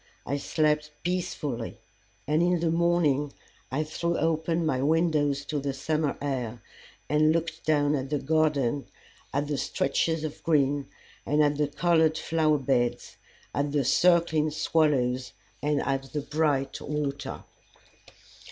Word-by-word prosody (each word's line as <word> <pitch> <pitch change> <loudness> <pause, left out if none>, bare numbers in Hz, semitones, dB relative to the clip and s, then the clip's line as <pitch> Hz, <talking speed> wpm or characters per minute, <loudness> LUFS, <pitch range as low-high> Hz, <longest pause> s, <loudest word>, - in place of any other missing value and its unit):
I 140 - -1
slept 150 +1 +1
peacefully, 155 -9 -3 0.5
and 155 +3 +2
in 175 0 +2
the 165 -1 +1
morning 165 -4 +2 0.4
I 145 +4 0
threw 170 +2 -2
open 165 +1 0
my 130 -5 0
windows 150 -2 +1
to 150 0 -2
the 140 0 -2
summer 155 +1 -1
air 125 -5 -3 0.4
and 155 +2 +3
looked 165 0 -2
down 145 -1 +3
at 135 -2 -2
the 150 - 0
garden, 145 -3 +1 0.4
at 140 +2 0
the 145 -2 -2
stretches 160 +3 0
of 155 -1 -5
green 145 -3 +1 0.4
and 150 +1 +2
at 145 -1 +2
the 150 - +2
colored 160 +1 +2
flower 155 -2 +2
beds, 125 -3 -1 0.4
at 145 0 -1
the 145 -3 +1
circling 170 -1 +3
swallows 135 -5 +1 0.3
and 150 0 +1
at 135 -1 -2
the 150 - -1
bright 145 -2 0
water. 145 -2 -4
150 Hz, 135 wpm, -27 LUFS, 140-160 Hz, 0.5 s, and